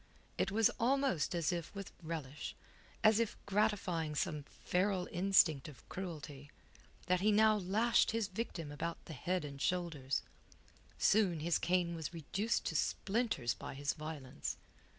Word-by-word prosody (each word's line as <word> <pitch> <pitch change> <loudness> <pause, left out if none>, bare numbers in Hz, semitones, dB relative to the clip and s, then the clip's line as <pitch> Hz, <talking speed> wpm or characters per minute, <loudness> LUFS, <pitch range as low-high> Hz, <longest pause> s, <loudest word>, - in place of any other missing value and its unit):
It - - +2
was 225 +3 +4
almost 240 - +2
as 170 0 +1
if 170 +2 -4
with 195 -1 -6
relish, 155 -3 -5 0.5
as 215 0 +6
if 230 -2 0
gratifying 195 -7 +1
some 150 0 -1 0.2
feral 185 0 +1
instinct 175 -6 +4
of 140 -6 -13
cruelty, 150 -6 -6 0.6
that 180 0 +2
he 210 +2 +4
now 215 +1 +5
lashed 210 +5 +3
his 225 -2 0
victim 185 -7 -4
about 165 +3 -4
head 175 +3 -2
and 140 -1 -7
shoulders. 160 -8 0 0.7
Soon 190 -7 +3
his 170 +1 +2
cane 175 -1 +1
was 165 0 -5
reduced, 195 +8 -1
to - - -2
splinters 200 - 0
by 100 - -7
his 140 +1 -1
violence. 155 -4 -5
175 Hz, 140 wpm, -35 LUFS, 150-205 Hz, 0.7 s, as